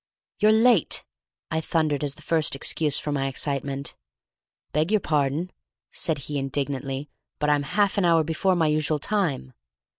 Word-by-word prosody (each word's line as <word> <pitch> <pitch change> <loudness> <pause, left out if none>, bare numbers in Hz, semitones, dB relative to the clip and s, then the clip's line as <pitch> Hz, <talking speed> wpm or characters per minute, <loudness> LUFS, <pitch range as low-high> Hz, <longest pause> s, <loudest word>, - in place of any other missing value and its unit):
"You're 215 +1 +5
late," 220 -4 +3 0.5
I 160 0 0
thundered 155 -3 0
as 145 -1 -2
the - - -15
first 160 -4 +2
excuse 150 +2 +1
for 150 - -3
my 135 -1 0
excitement. 140 0 -3 0.8
"Beg 155 +3 +1
your 215 0 +3
pardon," 150 +2 0 0.4
said 160 -2 -1
he, 145 -1 -2
indignantly, 135 0 -3 0.3
"but 150 0 +1
I'm 145 -1 +3 0.2
half 205 0 +3
an 190 - +2
hour 165 -2 +4
before 165 +4 +1
my 165 -2 +2
usual 155 0 +1
time." 150 - -1
150 Hz, 155 wpm, -25 LUFS, 140-170 Hz, 0.8 s, You're